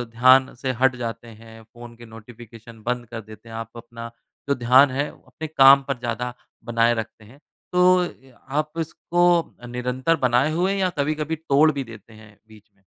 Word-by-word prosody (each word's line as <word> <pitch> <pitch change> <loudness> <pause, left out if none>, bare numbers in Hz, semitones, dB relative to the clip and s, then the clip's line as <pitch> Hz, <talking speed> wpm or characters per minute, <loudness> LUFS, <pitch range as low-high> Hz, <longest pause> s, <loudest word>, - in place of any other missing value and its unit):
ध्यान 130 +2 +5
से 130 +1 -3
हट 130 -1 +4
जाते 120 -1 -6
हैं 115 0 -14
फ़ोन 120 +1 -14
के 120 - -13
नोटिफिकेशन 115 0 -14
बंद 125 +1 -2
कर 115 -1 -6
देते 110 +1 -15
हैं। 115 - -9
आप 115 +1 -8
अपना 115 0 -10 0.4
जो 140 - +2
ध्यान 130 +3 +5
है 140 +3 -1
अपने 160 - -10
काम 140 -2 +6
पर 140 -2 -2
ज़्यादा 120 0 -4 0.3
बनाए 120 0 +2
रखते 110 -1 -6
हैं। 125 +7 -18 0.3
तो 180 0 +4
ए, 135 -6 -9
अ, 120 - -24
आप 150 +2 -1
इसको 170 +2 -1 0.4
निरंतर 125 +6 -1
बनाए 125 +5 +2
हुए 180 +5 0
या 190 -2 +1
कभी-कभी 155 +2 -1
तोड़ 155 -1 +3
भी 140 -2 -4
देते 115 -2 -14
हैं 105 -1 -17
बीच 110 -1 -19
में? 95 - -35
125 Hz, 185 wpm, -23 LUFS, 115-140 Hz, 0.4 s, काम